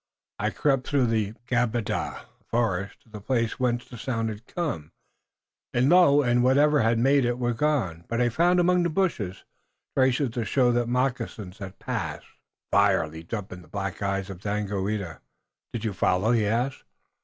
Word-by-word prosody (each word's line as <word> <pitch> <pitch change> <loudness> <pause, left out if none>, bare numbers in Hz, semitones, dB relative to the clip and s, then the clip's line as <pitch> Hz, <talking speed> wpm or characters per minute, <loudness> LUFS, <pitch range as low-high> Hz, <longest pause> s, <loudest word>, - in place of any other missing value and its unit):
I - - +1
crept 135 -3 0
through 140 -3 +2 0.4
Gabada 120 -3 -1 0.2
(the - - -35
forest) 100 -5 -1
to - - -26
the 105 -1 -9
place, 115 +1 -1
whence 120 -1 0
the 120 - -10
sound 115 -4 -1
had 110 +2 -8
come, 135 - -4 0.8
and 125 +3 +3
lo! 150 -5 +6
it 125 - 0
and 120 0 +3
whatever 145 +3 +4
had 115 +1 +2
made 135 +3 +4
it 120 0 0
were 120 -1 0
gone, 110 - 0
but 115 - -2
I 120 -1 +3
found 175 +8 +3
among 180 0 +4
the 170 - +1
bushes 150 - -1 0.5
traces 130 0 +2
to 115 0 -2
show 125 +2 +2
that 120 -1 0
moccasins 120 -6 -2
had 95 -1 -8
passed." - - -4 0.5
Fire 100 -5 +4
leaped 80 +6 -7
up 105 -2 -6
in 90 -1 -8
the 85 - -17
black 100 +1 -4
eyes 100 0 -1
of 90 - -9
Daganoweda. 100 -3 -3 0.5
"Did 115 -1 -4
you 110 - -1
follow?" 95 +4 +2
he 110 -4 +2
asked. 120 +5 -1
120 Hz, 180 wpm, -26 LUFS, 100-130 Hz, 0.8 s, lo